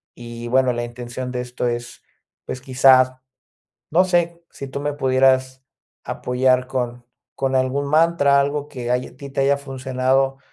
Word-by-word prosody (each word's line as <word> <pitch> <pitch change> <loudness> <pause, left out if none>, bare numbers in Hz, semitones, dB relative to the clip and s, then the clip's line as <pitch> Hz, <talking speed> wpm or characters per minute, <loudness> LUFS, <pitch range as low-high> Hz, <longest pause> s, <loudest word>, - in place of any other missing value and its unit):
y 120 0 -8
bueno, 130 0 +2
la 120 - -3
intención 120 +1 -6
de 125 - -3
esto 125 0 -3
es, 120 0 -5 0.4
pues, 130 - -5
quizás, 130 -1 +5 0.8
no 175 +4 +4
sé, 170 -2 0
si 140 - -8
tú 140 - -5
me 145 0 -2
pudieras 130 -1 +2 0.4
apoyar 125 0 +1
con 125 -2 -3 0.3
con 135 0 -1
algún 130 +2 0
mantra, 155 -2 +3
algo 145 +1 -1
que 125 -4 -6
haya 125 +1 -2
ti 140 0 -9
te 135 - -2
haya 140 +1 +3
funcionado, 135 0 -1
130 Hz, 155 wpm, -21 LUFS, 125-140 Hz, 0.8 s, quizás